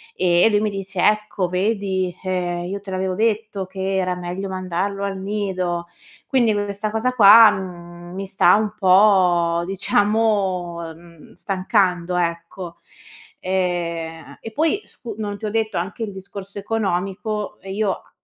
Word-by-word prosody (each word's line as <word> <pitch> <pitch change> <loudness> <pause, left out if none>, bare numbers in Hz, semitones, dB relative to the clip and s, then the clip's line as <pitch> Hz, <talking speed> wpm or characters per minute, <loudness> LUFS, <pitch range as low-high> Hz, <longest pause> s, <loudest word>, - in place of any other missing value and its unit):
e 175 0 +4
lui 205 0 +3
mi 215 - +1
dice: 195 -2 -4
"Ecco 210 -4 +1
vedi, 190 -2 -1
ehm, 175 -2 -2
io 200 +2 -4
te 195 -1 -9
l'avevo 185 0 -1
detto 215 -2 -1
che 190 0 -3
era 185 -1 0
meglio 180 +2 -5
mandarlo 185 +2 -3
al 195 -1 -2
nido"; 190 -4 -2 0.4
quindi 240 -5 +3
questa 205 +1 -2
cosa 225 +3 0
qua, 220 -1 +9
mhmm, 175 -3 -8
mi 195 0 -5
sta 195 0 +4
un 215 -1 0
po', 185 -4 +4
diciamo, 195 -3 0
ehm, 170 -1 -16
stancando, 185 -3 0
ecco. 170 +1 -3 0.6
Ehm 170 -3 -3
e 225 - -7
poi 320 - +1
scu 230 -4 -9
non 205 -2 -4
ti 220 - -6
ho 210 - -1
detto 220 0 -1
anche 190 +6 -3
il 210 - -4
discorso 195 +1 -8
economico 205 0 -2
e 195 - -8
io 205 -1 +1
a - - -13
190 Hz, 150 wpm, -21 LUFS, 180-210 Hz, 0.6 s, qua